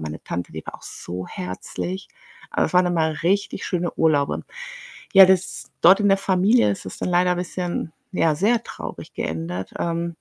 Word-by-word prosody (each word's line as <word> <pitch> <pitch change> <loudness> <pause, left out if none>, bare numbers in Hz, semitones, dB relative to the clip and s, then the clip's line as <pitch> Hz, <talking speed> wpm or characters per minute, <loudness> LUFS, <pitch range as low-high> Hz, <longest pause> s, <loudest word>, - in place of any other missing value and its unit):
meine 80 0 -6
Tante, 90 -2 -5
die 80 -1 -7
war - - -7
auch - - -23
so 90 +1 -7
herzlich. 95 - -5 0.4
Aber - - +1
es - - -8
waren 180 0 +5
immer 160 -2 0
richtig 195 +2 0
schöne 175 -1 -1
Urlaube. 150 -3 +2 0.7
Ja, 195 -1 +10
das 185 -1 0
dort 190 +5 +7
in 205 - +3
der 195 - +4
Familie 195 - +3
ist 100 - -4
das 95 - -7
dann - - -2
leider 180 0 +3
bisschen, 175 -2 -3 0.2
ja, 160 -4 +2
sehr 225 +8 +2
traurig - - -8
geendet, 85 +3 -4
ähm 170 0 -1
175 Hz, 175 wpm, -23 LUFS, -, 0.7 s, Ja